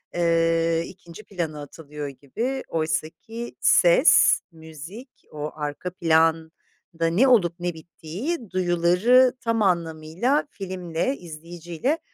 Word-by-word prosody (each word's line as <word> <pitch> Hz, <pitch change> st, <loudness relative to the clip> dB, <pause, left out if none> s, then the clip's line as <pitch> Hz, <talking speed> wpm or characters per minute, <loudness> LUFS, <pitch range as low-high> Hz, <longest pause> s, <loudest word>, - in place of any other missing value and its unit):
eee, 165 Hz, -1 st, +2 dB
2. 175 Hz, +2 st, -13 dB
plana 170 Hz, -7 st, -5 dB
atılıyor 150 Hz, 0 st, -8 dB
gibi. 225 Hz, -, -4 dB
Oysaki 160 Hz, +9 st, -4 dB
ses, -, -, +5 dB
müzik, 160 Hz, -, -11 dB, 0.2 s
o 150 Hz, 0 st, -5 dB
arka 150 Hz, +4 st, -4 dB
planda 165 Hz, 0 st, 0 dB
ne 225 Hz, +11 st, +4 dB
olup 190 Hz, -10 st, +4 dB
ne 175 Hz, -1 st, -2 dB
bittiği, 185 Hz, -, -6 dB
duyuları 185 Hz, +8 st, +3 dB
tam 230 Hz, -2 st, 0 dB
anlamıyla 175 Hz, -, 0 dB
filmle, 185 Hz, +5 st, -3 dB
izleyiciyle, 170 Hz, -, -4 dB
170 Hz, 100 wpm, -24 LUFS, 160-215 Hz, 0.2 s, ses